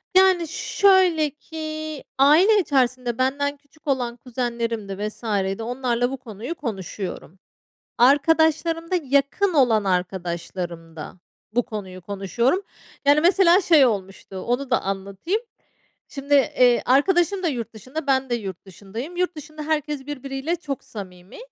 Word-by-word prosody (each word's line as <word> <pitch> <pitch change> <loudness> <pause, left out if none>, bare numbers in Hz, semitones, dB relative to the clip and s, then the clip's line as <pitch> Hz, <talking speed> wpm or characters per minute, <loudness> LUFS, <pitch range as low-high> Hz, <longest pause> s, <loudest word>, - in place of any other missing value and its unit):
Yani 375 -3 +5
şöyle 360 -2 +3
ki 310 0 -7
aile 330 +11 +6
içerisinde 255 - 0
benden 285 +2 0
küçük 285 +2 -26
olan 250 -4 0
kuzenlerimdi 235 -5 -3
vs. 215 - -11 0.3
di 225 - -5
onlarla 245 0 -1
bu 270 - -4
konuyu 235 - -7
konuşuyorum. 195 - -6 0.6
Arkadaşlarımda 320 +5 +3
yakın 280 +8 +1
olan 245 -8 +4
arkadaşlarımda 175 -3 -4 0.4
bu 245 - +3
konuyu 190 -5 -7
konuşuyorum. 205 - 0 0.4
Yani 290 +2 +5
mesela 365 +1 +5
şey 325 -6 +6
olmuştu 195 -4 -3
onu 245 +7 -2
da 250 - +2
anlatayım. 195 - -3 0.7
Şimdi, 280 0 -4
eee, 250 -3 +4
arkadaşım 350 +8 +3
da - - +2
yurt 235 -6 -3
dışında 260 +8 -7
ben 265 -1 +2
de 240 - +1
yurt 195 -6 -7
dışındayım. 210 - -8
Yurt 360 -1 0
dışında 305 0 -9
herkes 300 -2 -2
birbiriyle 275 +3 -3
çok 285 -6 -6
samimi. 185 -3 -10
265 Hz, 125 wpm, -23 LUFS, 215-310 Hz, 0.7 s, aile